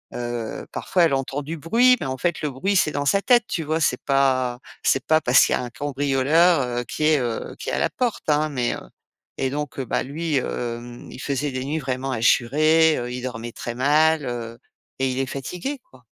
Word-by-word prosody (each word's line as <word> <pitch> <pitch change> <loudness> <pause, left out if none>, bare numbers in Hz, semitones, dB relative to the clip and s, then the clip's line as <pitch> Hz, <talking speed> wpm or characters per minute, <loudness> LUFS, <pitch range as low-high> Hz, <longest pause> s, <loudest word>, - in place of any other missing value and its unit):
heu, 120 -2 -4
parfois 180 -2 +1
elle 160 - +3
entend 135 +1 -2
du 160 +3 -5
bruit 235 - +4
mais 140 - -2
en 130 0 -3
fait, 175 +4 -1
le 150 - -1
bruit, 145 +10 -1
c'est 175 - +3
dans 145 -1 -2
sa 200 +7 +3
tête, 240 -1 +4
tu 180 - -2
vois? 155 +1 -1
C'est 125 - +1
pas 130 -3 +1 0.2
c'est 135 +1 +1
pas 155 0 +3
parce 125 -1 +5
qu'il - - 0
y - - +4
a - - -2
un 125 - -5
cambrioleur, 145 +5 +2
heu, 120 -1 -2
qui 155 - -4
est, 155 -1 +4
heu, 120 -3 -3
qui - - -5
est - - -3
à - - 0
la - - +1
porte, 245 -3 -2
hein 150 +1 +2
mais 125 -4 -1 0.6
et 135 -1 -1
donc 145 -1 -4
bah, 125 - -1
lui, 155 +3 -2
hem, 120 -1 -4
il - - -10
faisait 140 0 -2
des 130 0 -3
nuits 150 +3 -2
vraiment 135 -1 -3
hachurées, 155 +7 +3
heu, 120 0 -4
il 125 - -5
dormait 120 -2 -5
très 120 +1 -6
mal, 150 +3 +3
heu 115 -1 -5 0.4
et 135 0 +1
il 130 - -3
est 135 - -1
fatigué, 180 - -5
quoi. 125 -2 -19
135 Hz, 220 wpm, -23 LUFS, 125-155 Hz, 0.6 s, parce